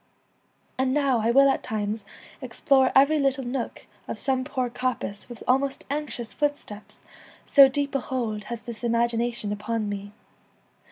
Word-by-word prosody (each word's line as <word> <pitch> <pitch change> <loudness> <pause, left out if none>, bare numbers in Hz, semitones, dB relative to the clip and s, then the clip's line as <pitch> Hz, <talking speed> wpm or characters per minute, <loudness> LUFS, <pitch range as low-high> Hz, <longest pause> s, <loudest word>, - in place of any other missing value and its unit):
And 260 +1 +1
now 275 -5 +2
I 225 +1 +1
will 275 +3 +6
at 270 - +1
times 215 0 -3 0.4
explore 265 -3 +2
every 280 +3 +5
little 270 -1 +1
nook 245 0 -4 0.2
of - - -4
some 260 -2 0
poor 260 -2 -2
coppice 245 -4 -4
with 240 - -9
almost 270 +2 +1
anxious 285 -6 -4
footsteps, 290 -8 -4 0.4
so 275 -2 +8
deep 280 +1 -2
a 275 - +1
hold 225 -5 -3
has 235 0 -6
this 235 -1 -9
imagination 235 -2 0
upon 215 +1 -2
me. 205 0 -5
250 Hz, 150 wpm, -25 LUFS, 225-275 Hz, 0.4 s, so